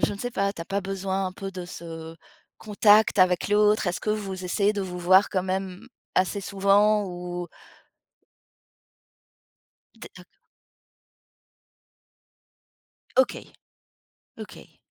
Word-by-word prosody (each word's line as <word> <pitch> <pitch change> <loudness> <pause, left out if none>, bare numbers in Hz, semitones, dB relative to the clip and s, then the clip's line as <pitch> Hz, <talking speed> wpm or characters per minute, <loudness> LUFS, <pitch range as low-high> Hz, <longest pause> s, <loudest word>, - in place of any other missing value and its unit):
je - - +1
ne 200 - -8
sais 245 +3 -4
pas, 200 -3 -1
tu 185 - -10
as 165 - -6
pas 195 +1 -2
besoin 195 0 -3
un 185 - -4
peu 195 +1 -7
de 180 -2 -7
ce 165 -2 -9 0.4
contact 210 0 +3
avec 185 0 +3
l'autre? 210 0 +3
Est-ce 175 - -2
que 215 - -2
vous 195 -3 -4
essayez 200 +3 +1
de 200 - -2
vous 180 -1 -6
voir 185 +3 +4
quand 185 -2 0
même 190 +3 -4 0.3
assez 190 +2 0
souvent 200 +2 +3
ou? 175 -1 -6 2.5
D'ac - - -13 3.0
OK. 260 0 +1 0.9
OK. - - -12
195 Hz, 120 wpm, -25 LUFS, 180-205 Hz, 3.0 s, voir